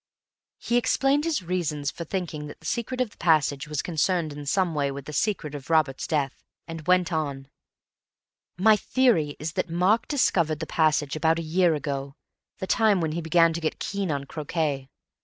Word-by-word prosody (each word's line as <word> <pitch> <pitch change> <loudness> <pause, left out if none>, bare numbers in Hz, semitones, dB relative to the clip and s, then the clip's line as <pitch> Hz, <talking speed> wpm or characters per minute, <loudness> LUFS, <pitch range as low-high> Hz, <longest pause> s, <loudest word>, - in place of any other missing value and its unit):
He 240 - 0
explained 275 +4 +2
his 320 - 0
reasons 160 -5 -2
for 170 - -7
thinking 160 -4 -4
that 145 - -11
the - - -18
secret 250 +2 -2
of 240 -4 -1
the - - -21
passage 150 -4 +2
was 150 -2 -2
concerned 165 -1 0
in 145 0 -8
some 185 +1 +1
way 145 -2 0
with 140 0 -7
the 150 - -8
secret 160 -3 -1
of 145 0 -8
Robert's 155 -5 +1
death, 145 -4 -1 0.2
and 165 -1 -8
went 180 -1 +3
on: 140 -4 -3 1.1
"My 215 +4 +6
theory 205 - +2
is 155 +1 -4
that 185 -1 -2
Mark 185 +7 +2
discovered 170 - +1
the 160 - -3
passage 155 -3 +1
about 160 +1 +2
a 165 - -3
year 170 +1 +2
ago—the 140 +4 -7
time 215 -1 +3
when 160 -2 -1
he 170 +2 -3
began 165 +1 +4
to 170 - -4
get 155 - -2
keen 200 -2 -3
on 140 -2 -1
croquet. 145 -2 -3
160 Hz, 185 wpm, -26 LUFS, 150-185 Hz, 1.1 s, My